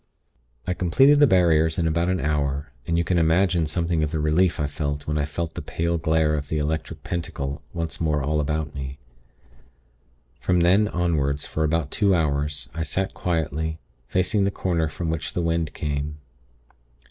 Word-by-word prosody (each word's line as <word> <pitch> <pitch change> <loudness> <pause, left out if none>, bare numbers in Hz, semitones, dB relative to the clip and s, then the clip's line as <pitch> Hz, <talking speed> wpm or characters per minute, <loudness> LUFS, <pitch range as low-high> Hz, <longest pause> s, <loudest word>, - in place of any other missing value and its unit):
"I 90 - 0
completed 135 - +4
the 145 - +7
barriers 80 -5 +3
in 85 - +1
about 85 +2 +1
an 95 0 +1
hour, 70 -1 -1 0.2
and 85 - +1
you 85 - +2
can 85 0 +1
imagine 85 0 +3
something 85 0 0
of 75 - 0
the 80 - -2
relief 80 +4 +2
I 75 - +1
felt 70 -1 -3
when 75 0 -1
I 70 - +1
felt 80 +2 -4
the - - -5
pale 85 0 -1
glare 80 -1 +2
of 75 -1 -2
the 80 - -1
Electric 80 +1 -3
Pentacle 75 -5 -4
once 85 -1 -4
more 75 -3 +1
all 75 +2 0
about 75 0 -1
me. 70 -1 -6 1.4
From 90 -1 +2
then, 95 +5 +4
onward, 80 -7 0
for 80 - -2
about 80 -1 0
two 100 -3 +3
hours, 75 -3 0
I 80 - -4
sat 95 +5 -2
quietly, 80 -2 -2 0.3
facing 95 - +1
the 100 - +2
corner 85 -4 0
from 80 +2 -3
which 80 -1 -3
the 85 - -1
wind 85 -1 -1
came. 75 0 -3
80 Hz, 180 wpm, -24 LUFS, 75-85 Hz, 1.4 s, the